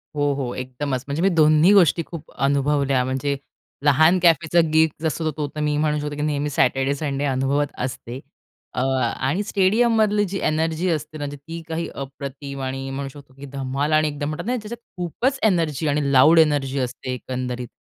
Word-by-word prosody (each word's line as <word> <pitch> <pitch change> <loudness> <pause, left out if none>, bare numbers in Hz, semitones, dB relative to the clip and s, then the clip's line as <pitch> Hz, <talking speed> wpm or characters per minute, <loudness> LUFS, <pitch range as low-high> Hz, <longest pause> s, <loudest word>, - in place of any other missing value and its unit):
हो, 145 -1 +1
हो. 130 -3 -3
एकदमच, 130 +1 -4
म्हणजे 140 +3 -2
मी 195 - +4
दोन्ही 155 +1 +5
गोष्टी 175 -4 +4
खूप 165 -2 -10
अनुभवल्या, 140 -1 +1
म्हणजे 135 +2 -1 0.5
लहान 155 +5 +5
कॅफेचा 170 -1 +3
गिग 160 0 +5
जसं 160 0 -1
तो 150 -1 -1
तर - - -4
मी 150 0 0
म्हणू 150 0 +1
शकतो 150 0 -4
की 150 - -4
नेहमी 150 -1 -1
सॅटरडे, 135 -1 +1
संडे 140 -1 -2
अनुभवत 135 +2 +1 0.2
असते. 125 -1 -6 0.5
अ, - - -1
आणि 135 +6 0
स्टेडियममधली 210 +1 +2
जी 195 - -2
एनर्जी 160 +3 0
असते 155 -1 -3
ना, 145 - -4
ती 165 +4 -8
काही 165 +1 -3
अप्रतिम 140 0 -7
आणि 135 +1 -4
म्हणू 135 0 -4
शकतो 140 -1 -15
की 140 - -9
धमाल 135 +2 -2
आणि 155 0 +4
एकदम 145 -1 -3
म्हणतात 155 +3 -5
नाही 250 +2 0
त्याच्यात 230 +2 -8 0.2
खूपच 240 - -1
एनर्जी 165 -7 +1
आणि 145 -1 0
लाऊड 145 +5 +6
एनर्जी 145 -3 +2
असते 130 0 -3
एकंदरीत 125 -1 -4
145 Hz, 175 wpm, -22 LUFS, 135-165 Hz, 0.5 s, लाऊड